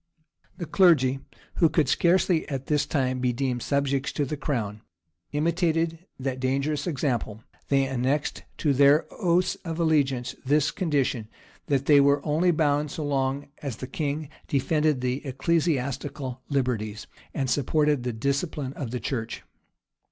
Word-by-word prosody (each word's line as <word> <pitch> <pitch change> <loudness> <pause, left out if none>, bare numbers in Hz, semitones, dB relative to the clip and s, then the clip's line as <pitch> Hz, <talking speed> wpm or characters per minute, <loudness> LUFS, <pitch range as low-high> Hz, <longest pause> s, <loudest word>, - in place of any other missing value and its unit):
] - - -39
The 170 - -4
clergy, 150 -6 +4 0.4
who 165 - +5
could 155 -3 +2
scarcely 170 +3 +2
at 135 -2 -4
this 150 -1 +1
time 130 -3 0
be 125 -1 +1
deemed 125 0 -2
subjects 140 0 0
to 145 - 0
the 150 - -3
crown, 110 -8 -3 0.5
imitated 165 +2 0
that 130 -1 -3
dangerous 140 +4 -1
example: 125 -8 -2 0.3
they 135 -1 +3
annexed 135 +3 -1 0.2
to 145 -3 +2
their 140 +3 +5
oaths 180 -2 +1
of 165 -1 -4
allegiance 140 -7 +1
this 145 +2 +2
condition, 140 - 0 0.4
that 140 -1 +1
they 145 -1 +6
were 140 0 +3
only 160 +4 +2
bound 150 -2 +2
so 150 +1 -4
long 135 0 -1
as 140 -6 -4
the 130 - -6
king 150 -1 -3 0.2
defended 150 0 +1
the 125 +2 -1
ecclesiastical 140 -2 -1
liberties, 120 -6 -1 0.3
and 135 -2 0
supported 145 +2 +2
the 125 0 -2
discipline 140 +4 -2
of 135 -5 -5
the 125 +1 -3
church. 115 -1 -4
140 Hz, 145 wpm, -26 LUFS, 130-155 Hz, 0.5 s, they